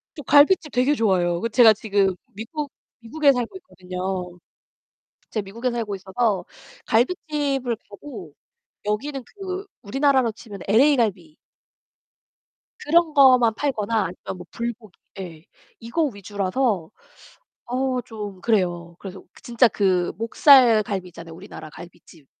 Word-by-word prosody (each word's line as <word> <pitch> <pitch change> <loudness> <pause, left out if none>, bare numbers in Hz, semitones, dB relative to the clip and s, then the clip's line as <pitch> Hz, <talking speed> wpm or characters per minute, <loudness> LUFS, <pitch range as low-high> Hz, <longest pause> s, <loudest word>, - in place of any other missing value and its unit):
저 295 - -8
갈빗집 295 +3 +4
되게 255 +4 +2
좋아해요. 180 -7 +1
그 230 - -1
제가 230 -2 +7
지금 200 -3 0 0.2
미국 265 +8 -6 0.3
미국에 280 +5 +2
살고 245 +3 -3
있거든요. 180 - -6 0.9
제가 215 -3 -3
미국에 230 +6 -3
살고 230 -4 -3
있어서 195 0 -1 0.4
갈빗집을 275 -2 0
가도 205 - -10 0.5
여기는 270 +7 -2
그 385 - -7 0.2
우리나라로 265 +1 +2
치면 210 -3 -11
LA갈비 215 - +2 1.5
그런 325 +1 +3
거만 255 -5 +6
팔거나 230 -5 -2
아니면 180 +1 -7
뭐 180 - -10
불고기 230 -4 -6 0.2
예 165 -4 -8 0.4
이거 235 +9 -1
위주라서 200 - -2 0.7
어 255 +1 -1
좀 210 -5 -8
그래요. 175 -6 0
그래서 190 -1 -9 0.2
진짜 240 +1 +4
그 185 -5 +1
목살 230 0 +6
갈비 195 -3 -4
있잖아요, 170 -1 -11
우리나라 160 -4 -10
갈빗집. 170 -2 -15
225 Hz, 280 characters per minute, -23 LUFS, 190-260 Hz, 1.5 s, 제가